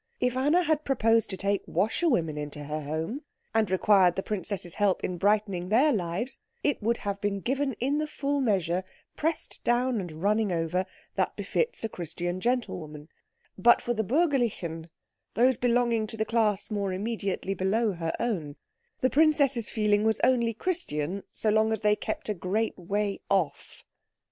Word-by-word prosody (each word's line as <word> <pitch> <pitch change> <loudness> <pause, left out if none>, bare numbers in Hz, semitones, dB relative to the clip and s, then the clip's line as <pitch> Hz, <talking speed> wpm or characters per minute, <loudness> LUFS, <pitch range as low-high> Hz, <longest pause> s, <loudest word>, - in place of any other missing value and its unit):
If 250 0 +1
Anna 295 +7 +3
had 310 -2 +1
proposed 225 -5 +2
to 190 - -5
take 200 +1 0
washerwomen 190 - +1
into 150 0 -5
her 150 +1 -4
home, 160 - -3 0.3
and 220 -3 +2
required 185 -1 +4
the 195 - -2
princess's 190 -3 -3
help 205 -3 +1
in 180 -1 -3
brightening 200 -3 +1
their 270 +8 +4
lives, 205 +7 -3 0.2
it 290 -5 +1
would 230 +2 +1
have 200 0 -2
been 205 -1 -1
given 270 +5 -1
in 275 +6 -1
the 305 - -1
full 285 -1 -1
measure, 185 -6 +1 0.3
pressed 320 +1 -2
down 240 -1 +1
and 165 -2 -8
running 210 0 +2
over, 175 +2 -1 0.3
that - - 0
befits 475 - -1
a - - +1
Christian 175 0 -4
gentlewoman; 160 -11 -2 0.5
but 240 +5 +6
for 240 - -2
the 220 -1 -1
Bürgerlichen, 230 - 0 0.5
those 250 +4 +4
belonging 235 -2 +1
to 225 - -7
the 220 - 0
class 215 -3 +1
more 200 -2 -1
immediately 195 -1 -2
below 205 +4 +1
her 165 -3 -3
own, 165 -12 -2 0.5
the 255 - +3
princess's 285 -6 +4
feeling 210 -1 +2
was 220 -1 +2
only 235 -3 +3
Christian 200 - -1
so 215 - 0
long 220 +1 +3
as 220 - -1
they 210 -1 +4
kept 215 - -4
a 210 - 0
great 205 +5 -1
way 200 +3 -2
off. 190 -6 -1
210 Hz, 165 wpm, -28 LUFS, 185-240 Hz, 0.5 s, but